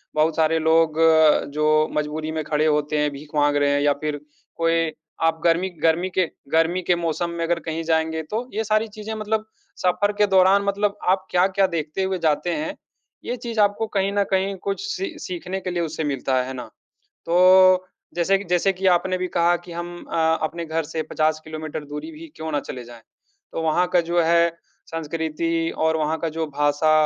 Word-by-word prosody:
बहुत 155 +1 +2
सारे 160 0 +2
लोग, 160 0 +3 0.6
जो 155 +1 +3
मजबूरी 155 +1 -2
में 155 - -1
खड़े 150 0 0
होते 150 0 +1
हैं, 150 0 +1
भीख 145 +1 -10
माँग 145 0 +3
रहे 145 0 +2
हैं 145 - +2
या 145 0 +3
फिर 150 -1 -2 0.4
कोई 165 -1 +1 0.4
आप 160 0 0
गर्मी 175 +2 +2
गर्मी 165 +3 +2
के 185 - +4 0.3
गर्मी 165 +3 +2
के 175 - +2
मौसम 170 0 -2
में 170 0 -3
अगर 170 0 0
कहीं 160 +1 -3
जाएँगे, 160 0 0
तो 220 +10 -4
ये 220 - -1
सारी 215 +1 +1
चीज़ें 215 +1 -5
मतलब 215 0 -2 0.4
सफ़र 195 +3 +2
के 210 - +4
दौरान 190 +1 +4
मतलब 200 +1 0 0.2
आप 190 0 -4
क्या-क्या 190 +2 +3
देखते 165 +1 -3
हुए 190 0 -1
जाते 155 +3 0
हैं, 155 +1 -3 0.5
ये 245 - -3
चीज़ 235 -2 -5
आपको 205 +2 +1
कहीं 195 0 +1
न 205 0 +2
कहीं 195 +1 +1
कुछ 200 - -2
सी 390 -5 -4
सीखने 180 +1 -4
के 185 - -4
लिए 175 -1 -1
उससे 160 0 -3
मिलता 135 -2 -1
है। 125 - -5
है 130 - -5
ना? 125 -3 -7 0.6
तो 185 +1 +5 0.3
जैसे 175 +3 +2
कि 195 - -7
जैसे 180 +1 +2
कि 190 +1 -5
आपने 185 +1 +1
भी 185 0 -2
कहा 175 0 +2
कि 175 - -10
हम 175 +1 -6 0.2
अ, 160 0 +2
अपने 170 +2 -3
घर 160 +1 -1
से 160 +1 -4
50 155 0 +1
किलोमीटर 155 -1 -6
दूरी 150 - -7
भी 320 +1 -10
क्यों 160 0 -5
ना 145 - +1
चले 125 -3 -7
जाएँ, 120 -1 -13 0.5
तो - - -2
वहाँ 160 +3 +2
का 175 - +5
जो 175 0 +1
है, 170 +1 +4 0.4
संस्कृति 165 +1 -2
और 160 0 +2
वहाँ 155 +1 0
का 165 - -2
जो 165 - 0
भाषा, 145 +1 +1
165 Hz, 200 wpm, -23 LUFS, 155-185 Hz, 0.6 s, तो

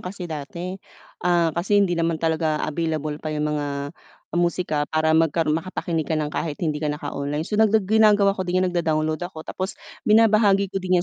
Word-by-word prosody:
kasi 180 0 -7
dati, 170 +4 -6 0.4
ah, 175 -2 +2
kasi 175 +6 +1
hindi 200 -3 +3
naman 165 -1 0
talaga 160 -1 0
available 155 -1 -2
pa 155 - -4
'yong 150 -1 -2
mga 150 -1 -1 0.6
musika, 170 -3 0
para 160 +1 +1
magka 160 +1 +3
makapakinig 165 0 -2
ka 160 - -1
ng 155 -1 -1
kahit 155 -1 -3
hindi 155 -3 0
ka 155 - -2
naka-online, 145 0 -3
so 210 +6 -3 0.2
ginagawa 210 0 +4
ko 190 -2 -3
din, 180 +1 +1
nag-da-download 160 -3 0
ako, 160 -3 -10
tapos 185 +4 -5 0.3
binabahagi 210 -3 +4
ko 195 - -2
din 180 -1 +1
165 Hz, 170 wpm, -23 LUFS, 155-185 Hz, 0.6 s, ginagawa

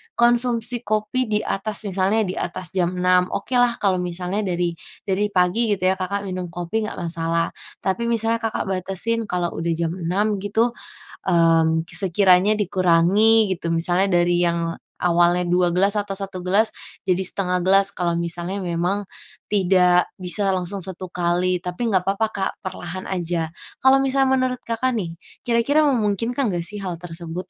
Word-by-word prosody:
konsumsi 240 0 +3
kopi 215 +3 -1
di 210 -1 0
atas, 210 +2 0
misalnya 200 +2 +1
di 185 -2 -4
atas 175 0 -3
jam 180 -1 0
6. 180 0 +3
Okelah 245 +2 +1
kalau 190 -2 +2
misalnya 180 +3 -3
dari 175 -1 -1 0.3
dari 200 +1 0
pagi 190 +4 +1
gitu 185 -1 +1
ya 190 - -3
Kakak 200 +2 -3
minum 185 -2 -4
kopi 175 +6 -3
nggak - - -7
masalah. 165 -1 -1 0.3
Tapi 200 +5 -1
misalnya 230 0 +1
Kakak 225 -1 -2
batasin 195 +5 -1
kalau 180 -3 -2
udah 165 0 -2
jam 165 0 -1
6 195 +4 -1
gitu, 220 +4 0 0.6
mmm, 165 -2 +3
sekiranya 190 +1 +4
dikurangi 195 +2 +3
gitu. 170 -1 -3
Misalnya 175 +3 +2 0.2
dari 175 0 +1
yang 170 -1 0 0.3
awalnya 175 0 +3
2 175 0 +2
gelas 200 +4 +2
atau 205 -1 -2
1 195 -1 -5
gelas 205 +5 +3 0.3
jadi 185 -1 +1
1/2 180 -1 0
gelas, 195 +1 +5
kalau 175 -3 -1
misalnya 170 +3 -3
memang 180 +3 -1 0.5
tidak 180 -3 +3
bisa 190 +3 +3
langsung 185 +2 -2
1 185 -1 -8
kali, 180 +1 0
tapi 180 +7 -3
nggak 185 -3 +1
papa, 200 +3 0
Kak, 190 -1 -2
perlahan 185 0 -6
aja. 170 -3 -2 0.3
Kalau 265 +1 +6
misalnya 270 0 +2
menurut 255 -1 -1
Kakak 230 +3 -1
nih 170 -6 -4 0.3
kira-kira 240 +6 +2
memungkinkan 240 0 0
nggak 175 -1 -2
sih 210 - -6
hal 185 -3 -4
tersebut? 170 +1 -7
185 Hz, 155 wpm, -22 LUFS, 175-215 Hz, 0.6 s, Kalau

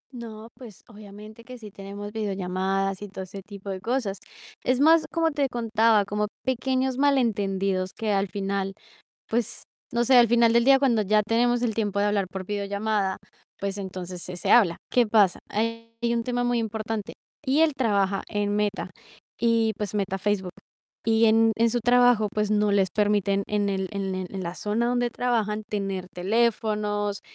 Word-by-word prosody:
No, 225 -2 -8
pues, 230 -7 -13
obviamente 215 +1 -12
que 250 +2 -10
sí 215 -3 -11
tenemos 200 +1 -8
videollamadas 195 -2 -2
y 205 - -6
todo 190 -1 -7
ese 195 +1 -9
tipo 200 0 -8
de 185 -1 -5
cosas. 225 -4 -2 0.4
Es 255 0 +1
más, 320 +3 +5
como 330 -1 +1
te 285 -1 0
contaba, 225 -3 +2
como 210 +1 -1 0.2
pequeños 260 +1 0
malentendidos 195 -9 +1
que 220 -1 -1
al 195 0 +1
final, 195 0 -3 0.6
pues, 235 0 -2 0.3
no 235 0 +2
sé, 255 +1 +5
al 240 -1 +7
final 235 0 +4
del 235 0 +3
día 270 0 +6
cuando 240 -6 +2
ya 210 +1 +3
tenemos 240 +2 +2
el 235 -3 0
tiempo 205 -2 -1
de - - +2
hablar 205 -2 +1
por 190 0 -6
videollamada, 200 -1 -1 0.4
pues, 200 0 -3
entonces 185 -2 -6
se 180 0 -7
se 175 - -1
habla. 195 -8 +5 0.2
¿Qué 245 -2 +3
pasa? 210 -4 +3
Hay 230 +1 -3 0.2
un 230 -1 0
tema 245 -1 -1
muy 245 -1 +1
importante 220 -1 -4 0.3
y 275 +4 +3
él 320 -1 +4
trabaja 200 -6 0
en 205 0 -1
Meta 205 -2 -1 0.5
y 230 -1 +2
pues 210 -3 -4
Meta 195 -1 -1
Facebook 190 -2 -1 0.5
y 225 0 +4
en 225 0 +4
en 230 +1 +3
su 240 - 0
trabajo, 245 -2 +4
pues, 210 0 0
no 210 -1 +2
les 195 -2 +2
permiten 205 -1 +1
en 205 -1 0
el 190 -1 -2
en 195 -1 -3
el 185 -1 -4
en 190 -1 -4
la 170 +1 -5
zona 220 +3 -1
donde 245 0 +1
trabajan 225 -3 -1
tener 195 -3 -3
teléfonos 210 0 0
210 Hz, 180 wpm, -25 LUFS, 195-235 Hz, 0.6 s, al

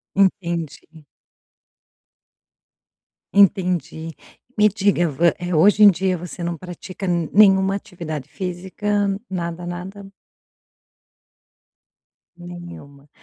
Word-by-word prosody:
Entendi. 170 -5 -1 2.3
Entendi, 180 -4 +2 0.5
me 210 0 +6
diga, 200 -3 +1
vo 150 +1 -4 0.2
eh, 175 0 -4
hoje 205 +6 +5
em 205 - +10
dia 185 0 0
você 175 +1 -8
não 170 0 -3
pratica 185 +2 -8
nenhuma 190 +3 +3
atividade 160 -8 -7
física, 185 +4 -6 0.4
nada, 175 -1 -4
nada? 190 +3 -8 2.3
Nenhuma. 175 -5 -11
175 Hz, 80 wpm, -21 LUFS, 170-195 Hz, 2.3 s, em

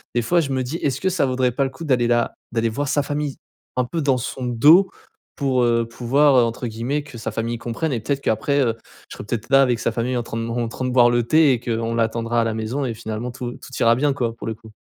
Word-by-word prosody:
des 120 - +3
fois, 175 +8 +2
je 140 -4 -3
me 130 -1 0
dis: 140 +7 -4
«Est-ce 135 -2 -1
que 190 - +1
ça 175 -6 +1
vaudrait 130 -1 +1
pas 140 - 0
le 135 - -1
coup 135 +5 -10
d'aller 125 -5 +2
la 120 0 +1 0.2
d'aller 115 -1 0
voir 140 +6 -3
sa 145 +1 +1
famille 145 -1 -3 0.4
un 125 - +1
peu 165 +6 -3
dans 135 -3 +2
son 130 +1 -5
dos?» 155 +11 +5 0.5
pour, 130 -3 +1
heu, 115 -1 +2
pouvoir, 135 +5 +2
heu, 120 - +6
entre 115 +1 -2
guillemets 120 +7 -2
que 140 -5 -11
sa - - -4
famille 115 +1 -3
«comprenne» 120 +7 -3
et 115 - -1
peut-être 140 +3 -2
qu'après 140 +6 0
je 120 -4 +2 0.4
serai - - -8
peut-être 110 +1 -4
là 135 0 +6
avec 125 -3 +1
sa 115 - 0
famille 120 +2 -1
en - - 0
train 115 -1 -4
en 120 0 -1
train 130 +2 -5
de 125 - -1
boire 120 -1 +5
le 120 0 +2
thé 155 +1 +4
et 120 - -1
qu'on 115 -1 -2
l'attendra 115 +1 0
à - - +2
la 115 - -1
maison 110 +6 -3
et 120 - -2
finalement 110 +2 -5
tout 125 -1 -6
tout 130 - -13
ira 115 0 +5
bien, 145 +2 +1
quoi, 120 -4 -2
pour - - -9
le 110 - -2
coup. 110 0 -16
125 Hz, 270 wpm, -21 LUFS, 115-140 Hz, 0.5 s, heu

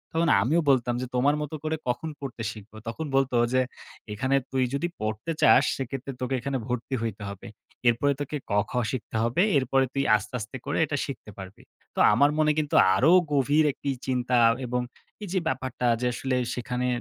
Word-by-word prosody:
তখন 165 0 +2
আমিও 155 +10 +2
বলতাম 125 -2 +2
যে, - - -2
"তোমার 140 +4 +3
মতো 150 +1 -4
করে 155 0 -1
কখন 140 +6 -1
পড়তে 125 -4 -6
শিখব?" 110 -1 -13
তখন 155 +8 -4
বলত 135 -1 +2 0.2
যে, 130 - +4 0.5
"এখানে 130 +5 0 0.2
তুই 130 -1 +1
যদি 145 +5 0
পড়তে 110 +8 -3
চাস, - - +6
সেক্ষেত্রে 135 +1 -5
তোকে 130 +1 -2
এখানে 140 +2 -2
ভর্তি 125 +2 -3
হইতে 110 -2 -4
হবে। 100 +4 -9 0.4
এরপরে 140 +5 +2
তোকে 145 +1 -3
কখ 105 +1 +1 0.2
শিখতে 125 -3 -6
হবে। 120 +9 +1 0.2
এরপরে 135 0 +2
তুই 140 0 0
আস্তে, 105 +2 -4
আস্তে 120 +5 -6
করে 145 - -2
এটা 145 0 -3
শিখতে 135 -7 -8
পারবি।" 95 0 -10 0.3
তো - - -3
আমার 145 - +5
মনে 155 0 +4
কিন্তু 150 -2 -1 0.2
আরও 155 - +4 0.2
গভীর 145 +2 +3
একটি 140 - -5 0.2
চিন্তা 125 -1 0 0.3
এবং 125 0 -1 0.4
এই 200 - -6
যে 190 - +2
ব্যাপারটা 130 -2 -2 0.2
যে 125 - +1
আসলে 130 +1 -2 0.2
সেখানে 125 +1 -2
130 Hz, 185 wpm, -26 LUFS, 120-145 Hz, 0.5 s, চাস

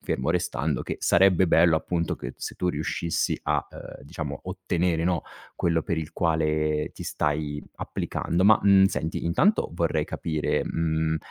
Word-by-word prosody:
fermo 65 +5 -1
restando 80 -5 -1
che - - -4
sarebbe 95 -1 +4
bello 85 0 +5
appunto 85 0 -1
che - - -7
se - - -6
tu 90 - -1
riuscissi 85 +1 -1
a, - - 0
ehm, - - -11
diciamo 75 -2 -6
ottenere, 90 -2 -1
no, 85 -1 0 0.3
quello 85 -2 +1
per 85 - -2
il 80 0 -5
quale 75 -2 0
ti - - -8
stai 75 0 -2 0.2
applicando. 90 +2 -2
Ma, 110 +1 +6
mh, 100 -1 +6
senti, 80 -4 -1
intanto 185 - +2
vorrei 80 -3 0
capire, 80 -2 -1
mhmm, 80 -1 0
80 Hz, 155 wpm, -26 LUFS, 75-90 Hz, 0.3 s, Ma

